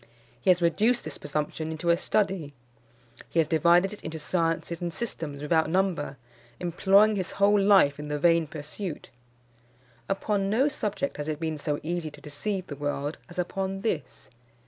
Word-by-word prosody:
He - - +1
has 180 -1 +5
reduced 220 +8 +2
this - - -6
presumption 150 +2 -3
into 160 +2 0
a - - +5
study. 190 -7 -1 0.7
He - - -5
has 160 - +5
divided 170 +5 +4
it 210 - -11
into 160 0 -5
sciences 165 +1 -1
and 175 -1 -2
systems 160 -9 -5
without 160 +1 +2
number, 175 -6 0 0.4
employing 195 +4 +4
his 185 -1 -3
whole 205 +1 +4
life 195 -8 +5
in 150 - -5
the 150 0 -2
vain 165 +1 +3
pursuit. 150 +3 -6 1.0
Upon 195 0 0
no 255 +8 +3
subject 275 0 -3
has 145 0 -4
it 155 -1 -2
been 160 -2 -2
so 145 0 -1
easy 170 0 -2
to - - -14
deceive 185 +6 -4
the 145 - -7
world 145 +1 -3
as 175 - -12
upon 190 +2 -2
this. 195 -8 -3
170 Hz, 170 wpm, -27 LUFS, 150-195 Hz, 1.0 s, has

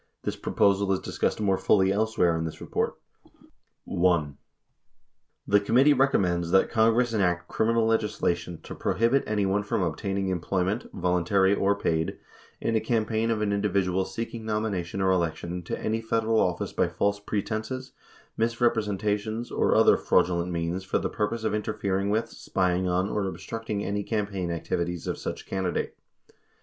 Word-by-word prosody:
This - - -2
proposal 100 0 +2
is 95 - 0
dis - - -8
cussed - - +1
more 95 -3 +1
fully 95 -2 +3
elsewhere 105 -5 +2
in 80 - -1
this 80 -1 -5
report. - - -2 0.9
42 - - -5
1. 85 -6 +2 1.1
The 100 - +4
committee 125 +8 +4
recommends 90 -11 +2
that 95 +2 +3
Congress 115 +1 +3
enact 90 -4 +1
criminal 115 0 +1
leg 115 0 +3
islation 85 -5 -2
to - - -8
prohibit 120 +5 +1
anyone 105 -1 +1
from 100 -1 -1
obtaining 95 +3 -2
employment, 95 +4 -1
voluntary 90 +2 +2
or 100 0 +2
paid, 80 -5 -1 0.4
in 115 - -1
a - - +4
campaign 110 0 0
of 110 -2 0
an 100 -1 0
individual 100 -2 +1
seeking 115 +4 -5
nomination 105 -5 -2
or 95 - +3
election 85 0 -1
to - - -4
any 110 +1 -1
Federal 115 0 +1
office 90 -1 0
by - - +2
false 100 0 0
pretenses, 110 +5 -3 0.5
misrepresenta 110 -3 +1
tions, 110 +3 -5
or - - +2
other - - +6
fraudulent 90 0 +1
means 85 +2 -2
for 95 - 0
the - - -2
purpose 110 +2 -2
of 110 -1 0
interfering 100 -2 -1
with, 110 +2 +1
spying 90 -1 0
on, 90 +2 +1
or 105 -1 -1
obstructing 110 +1 -4
any 100 +1 -1
campaign 100 -4 -2
activities 85 +1 -2
of - - -3
such - - -5
candidate. 95 -2 -2
100 Hz, 160 wpm, -27 LUFS, 90-110 Hz, 1.1 s, other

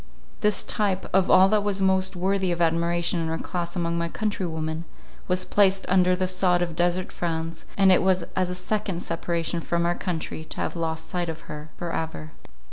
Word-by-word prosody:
This 210 -1 +2
type 195 -3 -1
of 190 -1 +3
all 185 +1 +7
that 210 0 +2
was 200 -1 0
most 190 0 +2
worthy 190 +1 +1
of 170 - -2
admiration 170 +1 +1
in 165 - -1
her 160 0 -1
class 175 0 -4
among 170 -1 -1
my 170 0 -1
countrywomen, 165 -6 -2 0.4
was 185 0 +1
placed 195 -1 +3
under 185 -1 +4
the 185 0 0
sod 180 -1 +2
of 170 -2 -4
desert 175 +1 0
France; 165 -1 -3
and 195 -1 +6
it 185 - +5
was 185 -1 +2
as 185 -1 +1
a 180 - -3
second 185 -1 -2
separation 170 0 -2
from 170 +1 0
our 175 - +2
country 170 -3 -4
to - - -7
have - - -2
lost 160 -1 -3
sight 175 -2 -2
of 160 0 -5
her 150 +1 -9
for 170 -1 -4
ever. 160 -1 -4
175 Hz, 200 wpm, -25 LUFS, 170-190 Hz, 0.4 s, all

